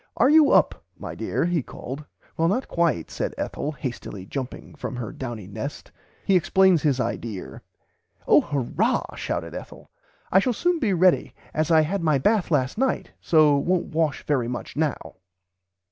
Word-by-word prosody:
"Are 265 - +5
you 310 -2 +7
up - - +3
my - - -7
dear? - - -1
he 175 -3 +1
called. 135 +3 -8 0.3
Well 165 - +2
not 210 +9 0
quite 165 - 0
said - - -3
Ethel 150 - -3
hastily 120 -9 -6
jumping 130 +4 -6
from 140 -3 -6
her 115 -5 -5
downy 120 -6 -6
nest." 110 +9 -7 0.3
He 195 - +3
explains 185 -1 +4
his 140 -4 +1
"idear." 110 -6 -4 0.7
"Oh - - +6
hurrah 140 -5 -1
shouted - - -4
Ethel - - -10 0.4
I 190 - +6
shall 245 +5 +1
soon 350 +7 +1
be 230 -8 +1
ready 185 0 +3 0.2
as 155 +1 0
I 160 -1 +6
had 180 +5 -1
my 155 -3 +3
bath 205 - +2
last 135 - 0
night 265 0 0
so 155 -3 +4
won't 175 +4 0
wash 160 -2 0
very 130 -6 +1
much 120 0 -6
now." 150 -2 -2
155 Hz, 165 wpm, -24 LUFS, 130-185 Hz, 0.7 s, you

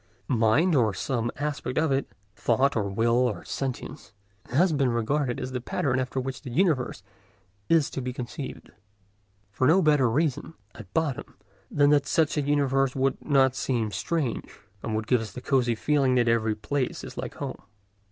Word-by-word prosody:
Mind, 120 +9 +3
or 110 -8 +2
some 120 +3 -1
aspect 145 -3 -3
of 160 -1 +2
it—thought 130 +1 0
or 105 -3 0
will 115 +4 +2
or 125 -4 0
sentience—has 130 - -3
been 140 -3 +2
regarded 120 +3 0
as 130 - -4
the 125 -1 -3
pattern 130 -1 -1
after 130 +1 -2
which 130 0 -4
the 135 - -8
universe 130 - 0 0.7
is 160 -4 +4
to 135 - -4
be 125 0 -3
conceived, 125 +2 -7 0.8
for 130 +6 +1
no 165 +5 +6
better 150 -7 +4
reason, 150 +4 -1 0.2
at 100 -4 -12
bottom, 155 -5 -1 0.3
than 145 0 +3
that 145 -2 +3
such 160 0 +2
a 150 - +1
universe 135 -2 +1
would 135 0 0
not 135 -3 +3
seem 120 -5 -1
strange, 150 +2 -3 0.2
and 110 - -3
would 110 0 -2
give 125 0 +2
us 105 -4 -7
the - - -6
cosy 125 -2 +1
feeling 135 +1 +2
that 120 -1 +3
every 110 -2 +2
place 130 +5 -2
is - - -8
like - - -5
home. - - -6
130 Hz, 170 wpm, -26 LUFS, 115-145 Hz, 0.8 s, no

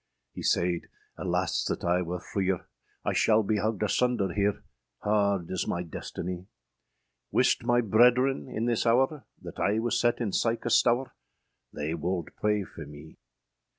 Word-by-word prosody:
Hee - - -8
sayd, 85 0 +1 0.3
âAlas - - 0
that - - -3
I 90 +1 +2
wer 90 +1 -3
freer, 95 0 -2 0.4
I - - +1
shal 110 -1 +4
bee 105 +1 0
hugged 110 0 -1
asunder 105 -4 +1
here, 100 0 0 0.4
Hard 100 -4 +1
is 95 - -2
my 85 - -1
destinie! 90 +2 -6 0.8
Wiste - - +2
my 120 0 +3
brederen, 125 +5 +3
in 115 -1 -2
this 120 -1 +1
houre, 130 +5 +2 0.2
That - - -9
I 105 +2 +2
was 115 +1 0
set 120 0 +2
in 115 -5 -1
sike 115 +3 0
a - - 0
stoure, 120 +2 +3 0.6
They 75 +2 -3
wolde 85 0 -2
pray 105 -1 +1
for 80 -4 -10
mee! 75 +2 -13
105 Hz, 155 wpm, -28 LUFS, 90-120 Hz, 0.8 s, shal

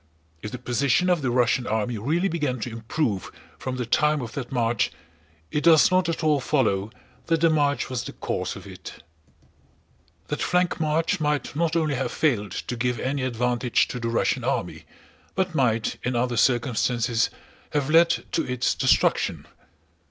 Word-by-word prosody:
If 105 - -5
the 125 - -6
position 130 +8 +1
of 175 -3 +2
the 130 - 0
Russian 120 0 +2
army 110 +1 -1
really 160 - +1
began 150 -8 -1
to 120 - -4
improve 115 - -2 0.3
from 130 -1 -4
the 125 -1 -3
time 150 +6 +2
of 115 - -6
that 135 -4 -5
march, 120 -3 +1 0.6
it 150 - -1
does 165 +1 +6
not 185 -1 +2
at 165 0 -2
all 150 -2 +3
follow 110 -8 +1 0.4
that 165 -1 +2
the 165 -1 +5
march 145 -2 +1
was 125 -2 -3
the - - -7
cause - - -3
of - - -10
it. - - -11 1.3
That 150 - -3
flank 180 0 +1
march 160 +5 +1
might 150 -1 -1
not 165 +1 0
only 155 -3 +1
have 130 0 -2
failed 105 - 0
to 125 - -4
give 120 0 -1
any 135 +1 -2
advantage 125 -1 +1
to 125 - -4
the 115 -1 -2
Russian 115 - 0
army, - - -2 0.5
but 185 -2 0
might 115 -7 +1
in 125 0 -2
other 120 0 0
circumstances 120 -1 +1 0.4
have 145 0 -1
led 165 +1 +6 0.2
to - - +1
its 125 0 0
destruction. - - +1
130 Hz, 170 wpm, -25 LUFS, 120-155 Hz, 1.3 s, does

